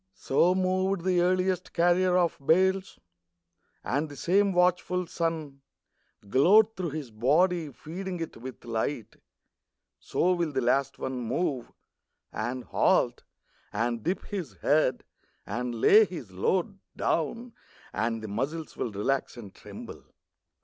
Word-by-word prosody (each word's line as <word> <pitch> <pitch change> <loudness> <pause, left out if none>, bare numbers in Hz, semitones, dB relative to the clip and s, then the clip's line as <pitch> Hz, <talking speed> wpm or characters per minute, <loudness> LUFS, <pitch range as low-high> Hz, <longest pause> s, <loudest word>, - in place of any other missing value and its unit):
So 170 - +2
moved 185 0 +1
the 180 -2 +3
earliest 185 0 0
carrier 180 +1 +3
of 175 -2 +2
bales, 190 +5 +2 0.9
And 145 +4 -1
the 145 - -10
same 195 - +2
watchful 180 0 +1
sun 160 -5 -3 0.7
Glowed 205 - +5
through 180 -3 -3
his 145 -5 -6
body 155 +8 +2
feeding 180 +6 -6
it 165 - -5
with 125 +1 -9
light. 115 +1 -3 0.8
So 180 +1 +1
will 170 -4 -1
the 135 - +1
last 135 +2 +1
one 130 -1 -4
move, 125 +1 -2 0.6
And 120 +3 -3
halt, - - +2 0.5
and 115 +2 -1
dip 180 - -2
his 185 - -5
head, 145 -4 +2 0.4
and 120 +3 -3
lay 215 - +7
his 155 - -8
load 185 - -1 0.2
Down, 230 +10 -1 0.4
and 115 +1 -1
the - - -4
muscles 140 +10 -4
will 115 - -3
relax 125 +7 -1
and 105 -5 -10
tremble. - - -10
160 Hz, 130 wpm, -28 LUFS, 125-185 Hz, 0.9 s, lay